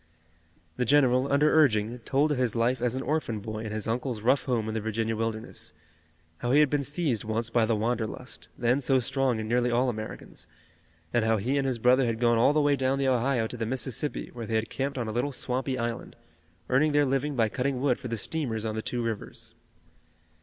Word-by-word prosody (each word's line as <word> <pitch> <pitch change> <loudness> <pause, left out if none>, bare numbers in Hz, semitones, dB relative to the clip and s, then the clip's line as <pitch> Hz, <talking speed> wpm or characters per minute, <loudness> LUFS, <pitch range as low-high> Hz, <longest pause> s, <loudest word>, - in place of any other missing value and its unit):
The - - +1
general, 130 0 +3
under 150 +2 +4
urging, 120 -6 +3
told 140 +6 +1
of 140 - 0
his 125 -3 0
life 120 +2 +1
as 125 0 0
an 130 - -3
orphan 145 -8 -1
boy 110 +1 -5
in 110 -1 -5
his 110 0 -3
uncle's 120 0 -2
rough 130 +5 +2
home 120 -5 0
in 110 - -3
the 110 - -2
Virginia 110 +1 -1
wilderness, 110 0 -4 0.7
how 120 - -2
he 145 - +6
had 150 -3 +4
been 145 -1 +2
seized 140 -4 0
once 110 +1 -2
by 115 -2 +3
the 115 - +2
wanderlust, 115 +3 -3
then 125 +3 +2
so 135 0 +3
strong 130 0 0
in 110 - -4
nearly 120 +1 +2
all 125 +2 +2
Americans, 110 -2 -7 0.7
and 120 -2 +3
how 110 0 +2
he 120 +7 -1
and 140 -1 +1
his 130 -2 -1
brother 125 +2 +4
had 115 -1 -2
gone 120 -1 +3
all 120 - +5
the 150 0 +2
way 145 -1 +3
down 135 0 0
the 135 -1 0
Ohio 125 -1 +2
to 120 - -6
the 115 - -2
Mississippi, 130 +3 -3
where 115 -2 -6
they 115 - -1
had 110 0 -1
camped 140 +1 -2
on 120 -3 -2
a - - -2
little 125 +6 -1
swampy 130 0 -2
island, 115 -1 -4 0.5
earning 145 +4 +3
their 145 0 +4
living 135 +2 0
by 115 -3 +3
cutting 130 +3 -2
wood 130 -2 +1
for - - -6
the 115 -1 -3
steamers 115 -3 -3
on 110 - -2
the 110 - -3
two 120 +1 -3
rivers. 115 -3 -5
125 Hz, 225 wpm, -27 LUFS, 115-135 Hz, 0.7 s, he